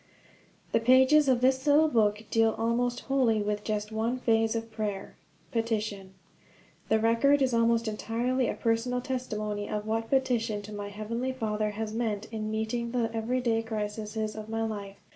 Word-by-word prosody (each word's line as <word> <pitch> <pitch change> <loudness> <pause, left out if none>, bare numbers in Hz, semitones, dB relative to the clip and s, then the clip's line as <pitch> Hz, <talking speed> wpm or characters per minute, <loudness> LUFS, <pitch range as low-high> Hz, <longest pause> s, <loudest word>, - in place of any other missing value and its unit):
_ - - -29
THE - - +3
pages 260 +5 +5
of 250 -2 +3
this 260 +2 +2
little 300 +2 +6
book 215 -6 +2
deal 225 -1 +3
almost 240 +2 0
wholly 255 -5 +2
with 210 0 -2
just 210 0 -2
one 225 +3 -1
phase 225 -2 +2
of 225 0 -4
prayer 210 -3 -4 0.4
petition. 215 -4 -2 0.7
The 220 - +4
record 230 +6 +3
is 255 -2 +1
almost 230 0 +2
entirely 235 +4 -1
a - - -2
personal 240 +2 0
testimony 215 -5 -3
of 210 0 -3
what 225 +1 -2
petition 240 -6 +1
to 210 +1 -9
my 205 0 -5
Heavenly 230 +5 -3
Father 215 -4 -1
has 220 -1 -3
meant 220 -3 -2
in 215 -1 -3
meeting 220 +2 -2
the 235 -2 0
everyday 230 0 0
crises 215 0 -4
of 215 0 -7
my 225 0 -1
life. 200 -3 -5
225 Hz, 165 wpm, -28 LUFS, 215-245 Hz, 0.7 s, little